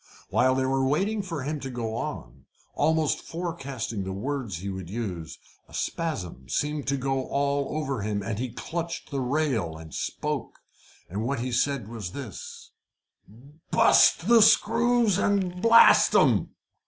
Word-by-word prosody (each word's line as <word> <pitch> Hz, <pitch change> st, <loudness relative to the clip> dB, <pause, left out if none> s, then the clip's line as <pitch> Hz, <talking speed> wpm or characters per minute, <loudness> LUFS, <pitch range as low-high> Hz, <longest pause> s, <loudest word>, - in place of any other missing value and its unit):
While 130 Hz, +1 st, +3 dB
they 130 Hz, 0 st, +1 dB
were 135 Hz, 0 st, +1 dB
waiting 195 Hz, +11 st, +1 dB
for 165 Hz, -8 st, -5 dB
him 150 Hz, +2 st, -3 dB
to 135 Hz, -, -6 dB
go 115 Hz, -3 st, -4 dB
on, 65 Hz, -, -6 dB, 0.3 s
almost 155 Hz, 0 st, +1 dB
forecasting 140 Hz, -, -5 dB
the 95 Hz, -, -4 dB
words 115 Hz, -, -3 dB
he 95 Hz, +4 st, -7 dB
would 95 Hz, -3 st, -6 dB
use, 95 Hz, -7 st, -5 dB, 0.3 s
a -, -, -11 dB
spasm 90 Hz, -, -4 dB
seemed 150 Hz, -1 st, -2 dB
to 140 Hz, +1 st, +1 dB
go 135 Hz, 0 st, -2 dB
all 140 Hz, +1 st, -1 dB
over 135 Hz, -6 st, -2 dB
him, 100 Hz, -1 st, -2 dB
and 105 Hz, +1 st, -3 dB
he 125 Hz, 0 st, -2 dB
clutched 170 Hz, +8 st, -5 dB
the 140 Hz, -1 st, -2 dB
rail 125 Hz, -, -1 dB
and 80 Hz, -1 st, -11 dB
spoke. -, -, -4 dB, 0.5 s
And 100 Hz, +5 st, -4 dB
what 125 Hz, 0 st, -2 dB
he 125 Hz, +1 st, -3 dB
said 125 Hz, -2 st, 0 dB
was 110 Hz, -6 st, -7 dB
this 125 Hz, -, -9 dB, 1.0 s
"Bust 170 Hz, -, +5 dB
the 235 Hz, -1 st, +7 dB
screws 225 Hz, -1 st, +4 dB
and 190 Hz, -3 st, 0 dB
blast 230 Hz, +1 st, +7 dB
'em!" -, -, +3 dB
135 Hz, 155 wpm, -26 LUFS, 110-160 Hz, 1.0 s, the